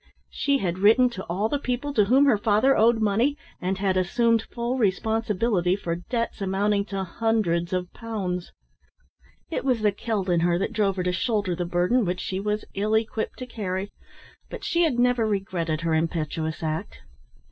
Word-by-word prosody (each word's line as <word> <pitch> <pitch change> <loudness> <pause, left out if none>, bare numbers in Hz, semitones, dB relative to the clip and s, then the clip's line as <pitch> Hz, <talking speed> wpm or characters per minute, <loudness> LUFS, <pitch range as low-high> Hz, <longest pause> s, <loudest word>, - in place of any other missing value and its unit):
She 280 -1 +1
had 185 -6 -2
written 225 +5 +5
to 190 -5 -6
all 190 +5 -1
the 285 +5 -1
people 265 +2 -2
to 210 -6 +4
whom 265 +7 +5
her 240 -7 +4
father 220 +6 +3
owed 225 +1 +4
money 225 +7 +1 0.2
and 185 +1 -1
had 190 -1 0
assumed 230 +5 +2
full 240 +3 -3
responsibility 210 -2 +1
for 170 -4 -3
debts 230 +4 -3
amounting 200 +1 +1
to 195 -2 -3
hundreds 180 -4 0
of 180 -1 -2
pounds. 190 -6 -4 1.0
It - - -2
was 255 -4 +1
the 210 -1 +3
Celt 205 -1 -3
in 175 -2 +2
her 170 +1 +2
that 195 - -2
drove 205 -3 +1
her 185 - -2
to 180 - 0
shoulder 205 -4 0
the 175 +1 -2
burden 180 +8 +2
which 180 -1 -2
she 190 - -3
was 210 +1 -2
ill 210 +2 0
equipped 220 0 -3
to 255 - -6
carry, 200 -5 -4 0.6
but - - -8
she 340 - +1
had 310 -8 +2
never 245 -2 +3
regretted 175 -6 -2
her 165 -1 0
impetuous 160 0 -2
act. 160 +5 -4
205 Hz, 180 wpm, -25 LUFS, 180-230 Hz, 1.0 s, written